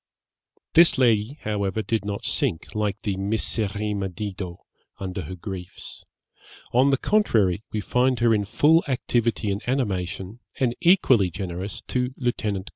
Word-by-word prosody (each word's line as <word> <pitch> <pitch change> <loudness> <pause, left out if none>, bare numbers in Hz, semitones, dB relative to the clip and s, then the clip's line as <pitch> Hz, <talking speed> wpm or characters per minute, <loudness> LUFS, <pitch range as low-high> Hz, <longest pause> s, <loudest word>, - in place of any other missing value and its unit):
This 170 -2 +7
lady, 120 +1 +2
however, 105 0 -1
did 110 -3 -1
not 100 -1 -4
sink, 115 - 0
like 105 -1 -2
the 100 -2 -1
'miserrima 105 0 -1
Dido,' 95 -2 -6 0.3
under 95 -1 -4
her 95 - -6
griefs; 90 -1 -7 0.7
on 130 +3 +5
the 135 - +3
contrary, 110 - +2
we 110 -2 -2
find 125 +4 +1
her 120 -1 +4
in 105 -2 +1
full 160 - +4
activity 120 -5 0
and 100 +2 -2
animation, 100 -4 -2 0.2
and 125 -3 +2
equally 135 - +5
generous, 95 +2 -5
to 125 +1 -1
Lieut. 125 -2 -1
105 Hz, 135 wpm, -24 LUFS, 95-125 Hz, 0.7 s, This